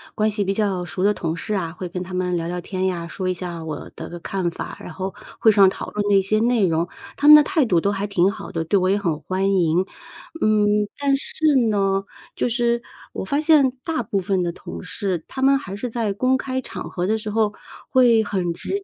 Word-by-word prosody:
关 215 0 +2
系 205 -1 -1
比 195 - 0
较 195 -3 0
熟 185 - -5
的 205 +1 +4
同 165 -5 -3
事 210 - -3
啊， 175 -5 -2
会 185 - -4
跟 180 +1 -5
他 185 0 -9
们 180 -1 0
聊 165 - -3
聊 180 - -3
天 185 +1 -3
呀， 170 -2 -2
说 185 +2 -4
一 - - +1
下 175 -2 -6
我 155 -2 -6
的 170 +2 -7
看 185 -2 -2
法， - - -6
然 - - -8
后 190 0 -4 0.3
会 220 - +5
上 200 -2 +6
讨 - - -6
论 210 0 -2
那 200 -1 +5
些 215 +3 +1
内 235 -3 +3
容， 165 +1 0 0.3
他 285 - -2
们 300 - +12
的 300 - +8
态 325 -4 +1
度 180 -7 +3
都 200 - +1
还 200 +1 -2
挺 190 -1 +3
好 - - -8
的， 165 - -2
对 200 - +2
我 185 - +1
也 200 - +3
很 170 -7 -1
欢 190 +3 0
迎。 180 0 +2 0.6
嗯， 210 -1 +3
但 280 -1 +2
是 315 - -2 0.3
呢， 195 -2 +1 0.3
就 - - 0
是 235 0 +1 0.3
我 - - -4
发 280 +9 0
现 300 -4 +5
大 320 -6 -1
部 200 -2 -1
分 190 0 0
的 175 - -1
同 - - -8
事， 180 -3 -3
他 265 - -6
们 275 +1 +5
还 195 -8 -8
是 245 +4 -4
在 225 -3 -1
公 255 +6 +2
开 260 0 -3
场 - - -7
合 180 0 -2
的 220 +2 +1
时 215 -1 -5
候 215 -1 +1 0.4
会 240 -4 +5
很 185 -4 -1
直 395 - -4
200 Hz, 255 characters per minute, -22 LUFS, 180-225 Hz, 0.6 s, 们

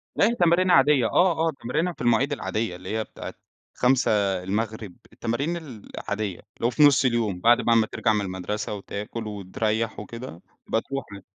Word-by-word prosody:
لأ - - +4
هي 235 - 0
تمارينها 175 0 +4
عادية 135 -2 +5
آه، 165 -3 +3
آه - - +1
تمارينها 165 +9 0
في - - -13
المواعيد 120 +4 +2
العادية 110 -8 -2
اللي 95 +5 -4
هي 110 - 0
بتاعة - - -9 0.4
17:00 105 -4 0 0.2
التمارين 140 +9 -2
العادية، 105 - -5 0.2
اللي - - -3
هو - - +4
في 150 +4 +3
نُص 140 -2 +6
اليوم، 115 -7 0
بعد 120 +5 +5
بقى 115 -1 +3
ما 110 -1 +4
ترجع 110 0 0
من 105 - +1
المدرسة 95 +3 -4
وتاكل 105 +2 -6
وتريّح 105 +2 -2
وكده 115 -4 -8 0.3
بتروح 135 +4 -2
عادي. 100 -1 -10
115 Hz, 170 wpm, -25 LUFS, 105-135 Hz, 0.4 s, نُص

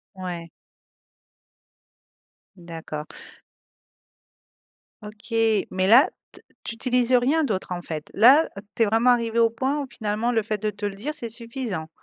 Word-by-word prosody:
Ouais. 175 -3 -6 2.1
D'accord. 165 -3 -8 2.0
OK. 210 +2 -12 0.4
Mais, 185 0 0
là, 240 +7 +7 0.4
t - - -32
tu 230 - -3
utilises 250 +1 +1
rien 275 +6 +3
d'autre, 190 -7 -3
en 175 - -4
fait? 155 -3 -6
Là, 265 +9 +6 0.3
tu - - +1
es 225 - +5
vraiment 225 +4 +3
arrivé 235 -1 +1
au 230 0 +5
point, 270 +5 -1
où, 280 - -4
finalement, 220 0 -2
le 225 -2 +1
fait 215 0 -3
de 215 +1 -1
te 205 0 -5
le 200 - -4
dire, 265 +10 -5
c'est 235 -6 -6
suffisant? 230 - -5
225 Hz, 145 wpm, -24 LUFS, 190-245 Hz, 2.1 s, là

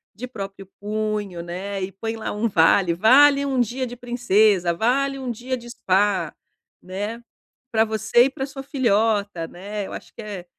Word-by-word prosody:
de 250 +4 -6
próprio 195 -4 -8
punho, 210 -4 -3
né, 190 +3 -5
e 185 - -4
põe 225 +4 -5
lá 225 - -4
um 210 +3 0
vale: 170 0 +4
"Vale 275 +8 +6
um 270 -2 0
dia 245 +2 0
de 245 0 -7
princesa"; 215 -7 +2
"Vale 270 +8 0
um 260 -2 -5
dia 250 +3 -4
de 240 -1 -11
spa", 200 -3 +1 0.5
né; 205 +6 -5 0.5
"Pra 220 -1 +4
você 220 +2 +3
e - - +1
pra 270 0 -4
sua 270 -1 -8
filhota", 210 - 0
né. 200 +4 -6
Eu - - -10
acho - - -9
que - - -9
é 200 -5 -7
215 Hz, 175 wpm, -23 LUFS, 195-245 Hz, 0.5 s, Vale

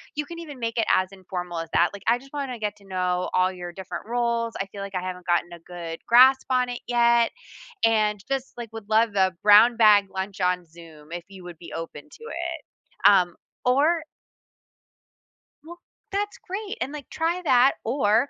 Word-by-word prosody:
You 295 - -2
can 335 +3 -9
even 300 -5 -9
make 230 0 -3
it 225 - +2
as 185 0 0
informal 180 -3 -6
as 165 - -6
that. 175 - +4
Like, 200 0 -10
"I 235 +1 +4
just 270 +3 -17
wanna 275 -4 -4
get 210 -1 -3
to 200 - -20
know 180 -1 -1
all 185 0 +3
your 175 -1 -7
different 190 +2 -7
roles, 235 -1 -1
I 195 - -1
feel 200 +1 -9
like 200 -1 -7
I 180 - -1
haven't 180 -1 -6
gotten 175 0 +1
a 170 - -10
good 165 -1 -8
grasp 260 +3 +6
on 250 -1 +2
it 245 - -4
yet, 235 -1 +3 0.5
and 215 -2 +3
just, 270 -1 -3
like, 235 -2 -6
would 220 -2 -9
love 220 0 +3
the 190 -2 +2
brown 215 +3 +7
bag 210 -3 +6
lunch 190 +1 -5
on 180 -1 +1
Zoom 160 -2 -15
if 175 0 -5
you 190 -2 -12
would 175 -2 -9
be 170 - -11
open 165 - -7
to 460 - -15
it." 345 -5 -4 0.5
Um, 180 -4 +5 0.3
or 305 +6 +3 1.6
Well, 345 +2 -11 0.3
that's 410 +1 -2
great. 410 +3 -5
And, 265 - -2
like, 290 -3 -8
try 335 +3 -1
that, 255 -2 +5
or 230 +1 +2
215 Hz, 195 wpm, -25 LUFS, 185-255 Hz, 1.6 s, brown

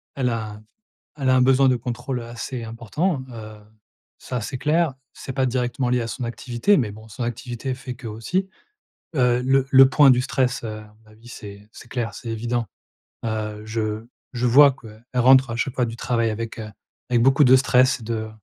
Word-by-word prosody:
Elle 130 -3 0
a 110 -2 -5 0.6
elle 130 -2 +1
a - - +5
un 130 - +4
besoin 135 +1 +4
de 130 - +3
contrôle, 125 +2 -4
heu, 115 - -8
assez 120 +1 -6
important, 130 - -2
heu, 110 -2 -9 0.6
ça, 125 - -4
c'est 130 - -5
clair, 155 0 +1 0.2
c'est 135 - -8
pas 130 0 +1
directement 125 0 -1
lié 125 0 +1
à 115 - -3
son 125 +2 -5
activité 120 - 0
mais 110 -8 0
bon 110 +1 -13
son 120 +3 -6
activité 120 +2 -4
fait 130 -1 -8
que 120 -1 -9
aussi. 180 - -2 0.7
Heu, 125 -1 +2
le 135 +1 +2
le 135 0 +8
point 140 -1 +6
du 125 - +4
stress, 130 -3 -1
heu, 110 -1 -5
à 105 0 -16
mon 110 - -21
avis 115 +2 -17
c'est 105 -2 -11
c'est 125 - -13
clair, 120 -2 -3
c'est 115 - -8
évident. 115 +1 -2 0.6
Heu, 110 -1 -3
je 110 0 -3 0.3
je 125 -1 -1
vois 140 +4 +7
quoi, 115 -4 -13 0.2
elle 125 - +1
rentre 130 0 +6
à 115 - -3
chaque 130 +2 -2
fois 125 - +1
du 115 - -7
travail 115 -1 0
avec, 115 +2 -5
heu, 110 -1 -6 0.4
avec 120 -1 +3
beaucoup 135 +3 +5
de 130 0 +7
stress, 130 -2 +3
de 110 -1 -3
120 Hz, 205 wpm, -22 LUFS, 115-130 Hz, 0.7 s, le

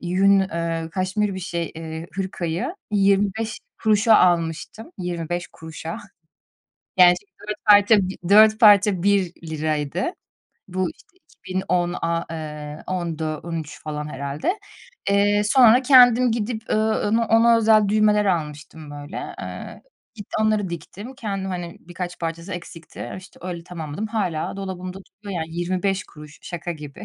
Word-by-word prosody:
yün, 195 +3 +3
eee, 165 -3 -2
kaşmir 190 +2 -1
bir, 190 - -5
şey, 170 -2 -4
eee, 160 0 -6
hırkayı 185 - -3 0.2
₺0,25 210 +2 +2
almıştım, 175 - 0
₺0,25. 170 -1 -5 1.0
Gerçi, 180 +1 +5 0.2
dört 210 0 -5
parça 205 0 +7 0.3
dört 215 +2 +6
parça 205 -4 +6
₺1. 160 -5 -1 0.7
Bu, 185 -1 -1
işte, - - -19
iki 185 - -13
bin 190 - 0
on 175 -1 +1
aaa, 165 0 0
eee, 150 -2 -6
ondu, 165 -4 -3
on 170 -1 -5
üç 150 - -10
falan 150 -1 -5
herhâlde. 140 - -3 0.5
Eee, 205 +1 +3
sonra 245 +2 +6
kendim 250 -2 +6
gidip, 225 0 -3
ııı, 215 -1 +1
ona 230 +2 +2
ona 230 +1 +5
özel 215 -2 +4
düğmeler 210 0 +3
almıştım, 155 -4 -3
böyle. 145 +3 -7
Eee, - - -8 0.3
git 205 -3 -9
onları 215 -2 +1
diktim. 195 - -8
Kendim, 195 -6 -4
hani, 175 -2 -5
birkaç 175 +1 -7
parçası 165 +3 -4
eksikti. 170 -1 -8
İşte, 190 +1 -15
öyle 175 -2 -6
tamamladım. 170 +3 -5
Hâlâ 195 -7 -2
dolabımda 185 -1 -6
duruyor, 200 -3 -7
yani. 160 0 -8
₺0,25. 175 -4 -3
Şaka 175 0 -5
gibi. 150 -3 -10
185 Hz, 130 wpm, -23 LUFS, 165-210 Hz, 1.0 s, parça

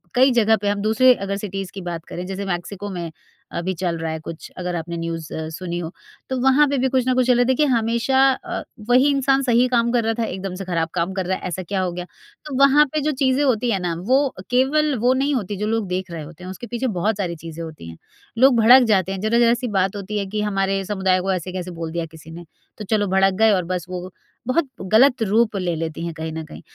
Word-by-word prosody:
कई 260 +2 +5
जगह 225 -2 +4
पे 205 - -4
हम 205 0 -1
दूसरे 245 +4 +5
अगर 200 0 -2
सिटीज़ 195 -2 -5
की 195 - -7
बात 170 -2 -5
करें 180 - -6
जैसे 195 +1 -5
मेक्सिको 195 +2 -4
में 175 -4 -5 0.4
अभी 180 +2 -2
चल 175 -3 -1
रहा 165 0 -3
है 160 - -4
कुछ, 160 +1 -9
अगर 180 -1 -3
आपने 170 0 -4
न्यूज़ 165 -1 -5
अ, 160 0 -4
सुनी 175 +1 -5
हो। 165 -1 -5 0.4
तो 260 - -1
वहाँ 265 +3 +5
पे 280 0 0
भी 260 +1 +2
कुछ 255 -1 +1
ना 255 - +3
कुछ 255 0 +2
चल 250 - +5
रहा 245 - +3
है। - - +3
देखिए 260 +4 +2
हमेशा 235 +3 +1
अ, 350 +5 -5 0.3
वही 255 +4 +5
इंसान 275 -1 +2
सही 245 -1 +3
काम 235 0 +3
कर 240 -1 +2
रहा 225 0 +1
था - - +1
एकदम 190 -2 -5
से - - -5
खराब 170 -2 -1
काम 175 +1 -1
कर 190 -1 -2
रहा 185 +1 -1
है, - - -15
ऐसा 180 +1 -4
क्या 190 +2 -2
हो 180 - -1
गया? 175 0 -6 0.4
तो 295 -3 -5
वहाँ 275 +2 +6
पे 305 - 0
जो 305 +2 0
चीज़ें 260 +2 +3
होती 245 -3 +1
है 195 - 0
ना 175 -2 -2
वो 260 +2 +5 0.3
केवल 280 +4 +2
वो 250 +1 +5
नहीं 280 +1 +1
होती 205 -4 -3
जो 210 +2 -2
लोग 225 -2 -1
देख 185 0 -3
रहे 165 -2 -5
होते 165 +3 -12
हैं 185 - -6
उसके 215 +6 -8
पीछे 240 +2 -2
बहुत 210 +4 0
सारी 180 -4 -2
चीज़ें 165 0 -6
होती 155 - -9
हैं। 80 - -11 0.4
लोग 260 +2 +6
भड़क 250 +4 +8
जाते 190 -1 +1
हैं 195 - -4
ज़रा-ज़रा 235 +2 +3
सी 245 +1 -3
बात 190 +1 +1
होती 205 +1 -4
है 200 - -2
कि 210 +1 -2
हमारे 195 -1 0
समुदाय 190 -2 +1
को 190 +1 -1
ऐसे 185 0 -4
कैसे 180 -1 -5
बोल 160 - -3
दिया 170 0 -2
किसी 160 0 -13
ने? 170 +1 -9 0.3
तो 215 - -6
चलो 205 0 +1
भड़क 190 0 +3
गए 220 0 +5
और 185 -3 +2
बस 180 -1 -3
वो 180 0 -6 0.4
बहुत 285 +4 +1 0.2
गलत 250 +3 +5
रूप 220 +1 +2
ले 180 -3 -1
लेती 160 0 -4
हैं 170 - -4
कहीं 160 0 -5
न 160 0 -5
कहीं। 155 - -11
195 Hz, 260 wpm, -21 LUFS, 175-245 Hz, 0.4 s, भड़क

